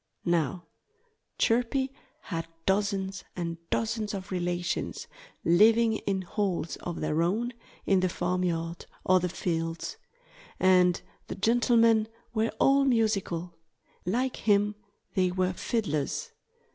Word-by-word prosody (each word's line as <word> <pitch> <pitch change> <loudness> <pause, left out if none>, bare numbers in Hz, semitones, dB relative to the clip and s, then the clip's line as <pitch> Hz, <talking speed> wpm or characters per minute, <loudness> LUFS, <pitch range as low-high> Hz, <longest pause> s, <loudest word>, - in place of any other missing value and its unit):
Now, 170 0 0 0.7
Chirpy 250 +3 +2 0.3
had 165 0 -4 0.2
dozens 195 -1 0
and 170 -2 -3
dozens 220 -2 -1
of 195 0 -7
relations 175 -1 -2 0.4
living 220 +5 +5
in 195 -2 -2
holes 185 -3 -1
of 175 - -5
their 155 +1 +1
own, 220 +8 0 0.3
in 195 -1 +4
the 185 0 +1
farmyard 170 -2 -2 0.2
or 185 0 +5
the 180 0 -1
fields. 165 -2 -3 0.6
And 180 -1 +5 0.3
the - - -5
gentlemen 230 0 +4 0.3
were 220 0 +1
all 275 +1 +5
musical. 210 -9 +1 0.5
Like 245 +8 0
him, 205 -1 +3 0.4
they 185 -3 +2
were 185 0 0
fiddlers. 200 - -2
190 Hz, 110 wpm, -28 LUFS, 175-225 Hz, 0.7 s, living